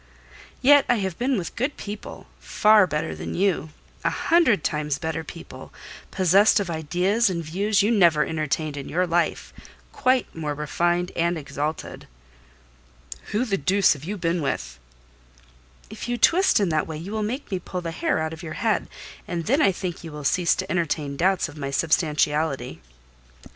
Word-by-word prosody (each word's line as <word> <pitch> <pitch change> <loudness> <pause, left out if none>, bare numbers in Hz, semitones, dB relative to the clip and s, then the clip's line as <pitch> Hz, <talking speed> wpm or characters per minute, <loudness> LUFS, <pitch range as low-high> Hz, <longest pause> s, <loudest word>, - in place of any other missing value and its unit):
"Yet 285 +2 +7
I 245 - +5
have 190 -5 -3
been 255 +1 +1
with 175 -4 -5
good 265 +5 -2
people; 205 0 -8
far 210 -2 +4
better 155 0 -2
than - - -6
you: 185 -4 0 0.3
a - - +2
hundred 315 - +2
times 150 -2 -1
better 160 -1 -3
people; - - -11 0.4
possessed 195 +4 +4
of 190 -4 -3
ideas 180 +8 +1
and 170 -2 -3
views 200 +5 +1
you 215 - +2
never 170 -8 +4
entertained 155 -1 -2
in 140 - -6
your 180 +2 +1
life: 170 0 -1 0.4
quite 255 -2 +1
more 150 -2 -3
refined 175 +4 0
and 170 +1 +1
exalted." 150 +1 -5 1.2
"Who 220 +5 -1
the 195 -5 -1
deuce 195 0 +3
have 145 -2 -11
you 205 +6 -4
been 170 -1 -1
with?" 140 - -3 1.1
"If - - -7
you 240 - -1
twist 360 - +4
in 200 -3 +1
that 155 -2 0
way 160 - -5
you 170 +6 -7
will 220 0 -2
make 235 +6 -4
me 190 - -1
pull 180 +1 -5
the 165 -1 -4
hair 165 - -1
out 160 0 -2
of 160 - -9
your 160 -3 -6
head; 220 +3 -1 0.4
and 170 -2 -3
then 275 +8 +2
I 195 - +5
think 180 -2 -5
you 165 - -8
will 150 0 -8
cease 170 +4 +2
to 190 +1 -4
entertain 155 -5 -1
doubts 185 +4 +1
of 150 -1 -12
my 140 -1 -3
substantiality." 150 - 0
175 Hz, 175 wpm, -24 LUFS, 155-205 Hz, 1.2 s, Yet